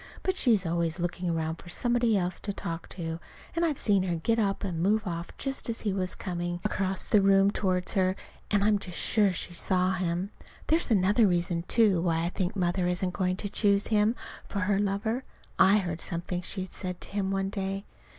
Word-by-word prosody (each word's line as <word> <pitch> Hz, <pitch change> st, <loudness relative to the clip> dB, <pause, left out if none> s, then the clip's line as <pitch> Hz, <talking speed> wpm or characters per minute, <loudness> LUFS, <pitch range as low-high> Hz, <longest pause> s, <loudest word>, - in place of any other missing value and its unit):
But 375 Hz, -, 0 dB
she's 225 Hz, -, +3 dB
always 170 Hz, 0 st, -1 dB
looking 175 Hz, +1 st, -2 dB
around 160 Hz, -1 st, -1 dB
for 175 Hz, -, -13 dB
somebody 240 Hz, +2 st, +2 dB
else 180 Hz, -1 st, -1 dB
to 205 Hz, -, -1 dB
talk 170 Hz, -4 st, -5 dB
to; 165 Hz, -2 st, -5 dB, 0.4 s
and 335 Hz, -, +1 dB
I've 310 Hz, -5 st, +1 dB
seen 200 Hz, -3 st, +3 dB
her 180 Hz, -2 st, -1 dB
get 225 Hz, +8 st, 0 dB
up 200 Hz, -2 st, 0 dB
and 175 Hz, -5 st, -2 dB
move 210 Hz, +4 st, +2 dB
off 170 Hz, -2 st, -4 dB
just 270 Hz, -3 st, -4 dB
as 230 Hz, -, -3 dB
he 205 Hz, -3 st, -1 dB
was 185 Hz, -2 st, -1 dB
coming 175 Hz, -1 st, -3 dB
across 190 Hz, -1 st, -1 dB
the 210 Hz, -, +4 dB
room 195 Hz, 0 st, +5 dB
toward 185 Hz, -3 st, 0 dB
her, 185 Hz, -2 st, +2 dB, 0.3 s
and 205 Hz, -1 st, +2 dB
I'm 210 Hz, 0 st, +3 dB
just 180 Hz, -3 st, -6 dB
sure 205 Hz, -3 st, +3 dB
she 180 Hz, -1 st, -3 dB
saw 185 Hz, +2 st, +1 dB
him. 185 Hz, +1 st, -2 dB, 0.3 s
There's 320 Hz, 0 st, +2 dB
another 210 Hz, +1 st, +4 dB
reason, 175 Hz, -1 st, 0 dB
too, 210 Hz, -7 st, +4 dB
why 165 Hz, -2 st, +1 dB
I 170 Hz, -, 0 dB
think 185 Hz, +1 st, -2 dB
Mother 180 Hz, -1 st, +1 dB
isn't 180 Hz, +1 st, -1 dB
going 185 Hz, -1 st, 0 dB
to 205 Hz, -, -3 dB
choose 200 Hz, -1 st, +2 dB
him 215 Hz, +1 st, +3 dB, 0.3 s
for 200 Hz, -, -2 dB
her 195 Hz, +1 st, +1 dB
lover. 205 Hz, +5 st, -1 dB, 0.4 s
I 200 Hz, +2 st, +7 dB
heard 175 Hz, -5 st, -2 dB
something 175 Hz, +1 st, -3 dB
she 185 Hz, +1 st, -2 dB
said 180 Hz, -1 st, -5 dB
to -, -, -7 dB
him 200 Hz, -1 st, -1 dB
one 195 Hz, 0 st, -1 dB
day. 195 Hz, 0 st, -3 dB
190 Hz, 205 wpm, -28 LUFS, 175-205 Hz, 0.4 s, I